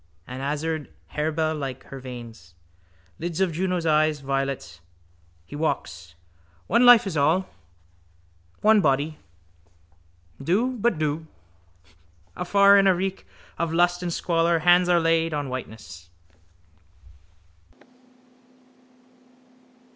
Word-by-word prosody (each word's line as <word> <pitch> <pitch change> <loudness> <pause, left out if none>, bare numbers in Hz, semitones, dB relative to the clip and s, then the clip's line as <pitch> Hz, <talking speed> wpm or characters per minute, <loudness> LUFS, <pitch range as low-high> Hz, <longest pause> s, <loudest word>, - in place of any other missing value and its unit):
An 130 +1 -8
azured 150 - -3 0.2
harebell 155 +1 -1
like 135 -4 -5
her 135 - -10
veins. 115 -8 -11 0.6
Lids 170 +1 -4
of 190 -2 +1
Juno's 180 +1 -2
eyes, 155 -1 +2
violets. 135 -11 -3 0.6
He 95 - -10
walks. 90 - -4 0.5
One 235 +5 +3
life 245 -3 +8
is 190 -4 -4
all. 160 +6 +2 1.1
One 215 0 +5
body. 145 +1 0 1.2
Do. 215 - 0
But 235 -4 +1
do. 155 +1 -2 1.1
Afar, 200 +2 +5
in 195 - +3
a 190 - +4
reek 190 +2 -4 0.3
of 170 -1 -1
lust 175 +1 +2
and 175 -1 -3
squalor, 170 0 +1
hands 175 +2 +4
are 175 -1 +4
laid 165 -1 +1
on 145 -2 -3
whiteness. 105 -9 -9
160 Hz, 105 wpm, -24 LUFS, 135-180 Hz, 1.2 s, life